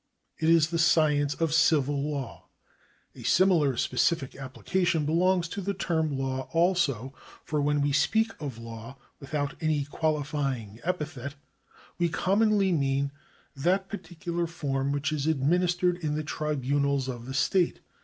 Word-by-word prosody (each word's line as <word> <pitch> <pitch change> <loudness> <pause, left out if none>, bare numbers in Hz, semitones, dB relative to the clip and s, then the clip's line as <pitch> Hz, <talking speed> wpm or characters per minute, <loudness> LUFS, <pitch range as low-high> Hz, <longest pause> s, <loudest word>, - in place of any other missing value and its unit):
It 160 - +2
is 165 -1 +4
the 165 - 0
science 150 -4 +3
of 165 -2 0
civil 145 -3 +3
law. 140 -5 -5 0.7
A - - -12
similar 165 -9 +3
specific 140 -1 0
application 155 +5 -1
belongs 175 +3 +2
to 200 - -4
the 200 +1 -2
term 160 -6 -1
law 130 0 -3
also, 165 - +1 0.3
for 150 -1 -1
when 145 0 +1
we 145 0 +1
speak 220 +11 +2
of 140 -6 -5
law 115 +2 -9 0.2
with 140 +2 -7
out 145 -1 -1
any 155 -3 +1
qualifying 145 -7 -2
epithet, 150 -6 -3 0.6
we 170 -1 +2
commonly 195 +5 +2
mean 140 -3 +1 0.4
that 185 +7 +1
par 205 - -4
ticular 170 0 -4
form 140 -4 -2
which 140 +1 -1
is 150 -1 -1
administered 175 +4 +2
in 155 -4 -2
the 155 - -2
tribunals 140 -2 -1
of 120 -2 -6
the 135 - -5
state. 175 +5 +2
150 Hz, 145 wpm, -28 LUFS, 140-170 Hz, 0.7 s, is